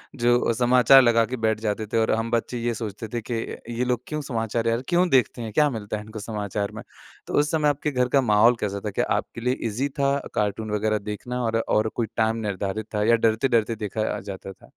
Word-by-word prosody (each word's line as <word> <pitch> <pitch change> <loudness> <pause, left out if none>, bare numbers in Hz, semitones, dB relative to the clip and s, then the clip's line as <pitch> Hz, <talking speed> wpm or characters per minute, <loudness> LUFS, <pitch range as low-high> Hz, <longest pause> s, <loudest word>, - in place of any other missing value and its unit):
जो 120 +1 +3
अ, - - +1
समाचार 125 +2 +6
लगा 115 -2 +4
के 130 +3 -5
बैठ 110 -1 0
जाते 110 0 -2
थे - - +3
और 110 0 +2
हम 115 +1 -1
बच्चे 120 +1 -1
ये 120 -1 0
सोचते 110 0 -6
थे 120 - -1
कि, - - +1 0.5
"ये 125 - +2
लोग 125 -1 0
क्यों 150 0 -3
समाचार, 115 -3 -2
यार, 115 +2 +1
क्यों 180 +1 +3
देखते 130 -2 +2
हैं? 110 -2 -5
क्या 150 -1 +4
मिलता 105 -4 -4
है 105 - -7
इनको 110 +1 -9
समाचार 105 -1 -3
में?" - - -7 0.4
तो - - -6
उस 150 +1 +1
समय 150 -2 +2
आपके 145 +1 -1
घर 125 -2 +1
का - - +5
माहौल 115 +4 +6
कैसा 100 -1 -2
था? - - 0
क्या - - 0
आपके 115 - -6
लिए 125 +2 0
ईज़ी 125 +7 -2
था 140 0 +2 0.2
कार्टून 105 +1 -1
वग़ैरह 110 +1 +1
देखना, 125 +4 -4
और 115 0 0
और 110 +1 +2
कोई 115 -2 -1
टाइम 110 0 +2
निर्धारित 100 +2 -3
था, 105 - +1
या 115 - +7
डरते-डरते 115 0 +2
देखा 110 0 -3
अ, - - -5
जाता 95 0 -8
था? - - -21
115 Hz, 235 wpm, -24 LUFS, 105-125 Hz, 0.5 s, या